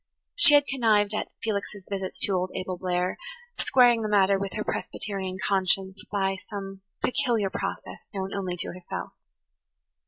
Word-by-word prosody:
She 320 -12 +7
had 285 -1 +6
connived 220 -6 +2
at 215 - -1 0.2
Felix's 205 -2 -3
visits 195 -2 -4
to - - +3
old 185 0 0
Abel 185 0 -3
Blair, 180 0 -1 0.4
squaring 245 -3 +5
the 215 - -2
matter 200 -1 +4
with 195 -1 -3
her 215 - -2
Presbyterian 190 -4 -4
conscience 190 0 +1
by 195 -1 0
some 195 -2 -6 0.2
peculiar 235 -7 +1
process - - -4
known 195 -2 -4
only 185 -3 -3
to - - -4
herself. 180 0 -6
195 Hz, 150 wpm, -27 LUFS, 190-215 Hz, 0.4 s, She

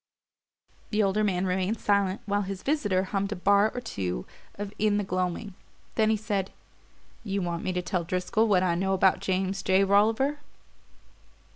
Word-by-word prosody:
The 215 0 +2
older 200 +2 +1
man 190 -3 +1
remained 190 +4 -1
silent 200 -2 +1
while 205 0 0
his 195 -1 -5
visitor 205 -11 +1
hummed 195 +1 -2
a - - -6
bar 200 +3 +3
or 250 - -4
two 90 - -4 0.3
of 205 0 -6
"In 210 -1 +2
the 205 - 0
Gloaming"; 185 +2 -2 0.4
then 220 -1 +2
he 220 - +2
said: 200 -3 -2 0.7
"You 200 -3 -2
want 170 -1 -3
me - - -1
to 180 0 -2
tell 175 0 -1
Driscoll 185 +6 0
what 190 -4 +3
I 180 -2 +2
know 190 +3 0
about 190 0 +3
James 190 0 -1
J. 190 +1 +3
Rolliver?" 220 +9 +2
195 Hz, 170 wpm, -27 LUFS, 185-210 Hz, 0.7 s, bar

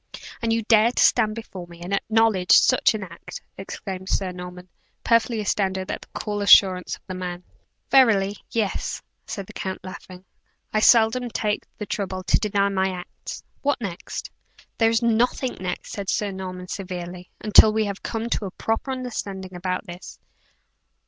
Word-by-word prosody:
"And 230 -1 0
you 225 0 +1
dare 220 +1 +5
to - - +2
stand 215 -3 +3
before 190 -6 -8
me 170 -1 -14
and 185 +3 -4
acknowledge 215 -2 +3
such 255 -3 +5
an 210 - -4
act?" 170 -2 -9 0.2
exclaimed 190 -1 -7
Sir 190 -2 0
Norman, 180 0 -9 0.4
perfectly 230 0 +2
astounded 190 -2 -1
at - - -4
the - - -13
cool 205 -1 -3
assurance 190 -2 +6
of - - -23
the 185 - -6
man. 180 -1 -5 0.5
"Verily, 205 -7 +5
yea," 215 -4 0 0.6
said 200 -3 -5
the - - -13
count, 190 -1 -5
laughing. 185 0 -10 0.5
"I 215 - +3
seldom 235 +2 +5
take 210 -2 -2
the 210 - -5
trouble 190 -2 -3
to 170 - +3
deny 200 -1 +1
my 190 -1 +1
acts. 180 -1 -8 0.2
What 285 0 +1
next?" 195 -7 -6 0.5
"There 225 -1 +5
is 230 0 +1
nothing 240 +2 +1
next," 180 -1 -4
said 200 -2 -5
Sir 205 -1 0
Norman, 185 -1 -6
severely, 180 -2 -6
"until 215 0 +7
we 220 0 +1
have 200 -1 -5
come 225 0 -3
to 210 - 0
a - - -3
proper 225 +7 -2
understanding 200 -7 -5
about 180 +2 -3
this. 175 -1 -10
200 Hz, 170 wpm, -24 LUFS, 185-225 Hz, 0.6 s, until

